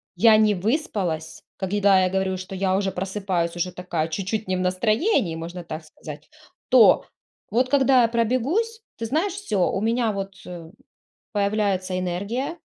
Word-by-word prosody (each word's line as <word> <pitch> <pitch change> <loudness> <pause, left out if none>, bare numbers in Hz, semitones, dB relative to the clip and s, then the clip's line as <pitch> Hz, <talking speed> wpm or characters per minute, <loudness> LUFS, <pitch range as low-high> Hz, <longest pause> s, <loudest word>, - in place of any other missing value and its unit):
я 225 -1 +6
не 215 -1 +4
выспалась. 180 - -2
Когда 195 0 +3
я 185 - +2
говорю, 190 0 -1
что 185 +1 -7
я 190 0 +1
уже 195 -1 -1
просыпаюсь 185 -2 -2
уже 180 +1 -2
такая 175 -3 -2
чуть-чуть 200 +5 -3
не 185 - 0
в 185 - -2
настроении, 205 - +1
можно 170 +2 -7
так 155 -1 -7
сказать. 155 - -11 0.4
То, 250 -3 +6 0.5
вот 250 +3 +2
когда 265 -3 +4
я - - +4
пробегусь, 260 - 0 0.2
ты 230 - -4
знаешь, 325 - 0
всё. 215 - 0
У 195 - -2
меня 230 0 +1
вот, 195 -1 -5
э, 170 -2 -9 0.6
появляется 200 -3 0
энергия. 215 - -3
195 Hz, 155 wpm, -23 LUFS, 180-230 Hz, 0.6 s, я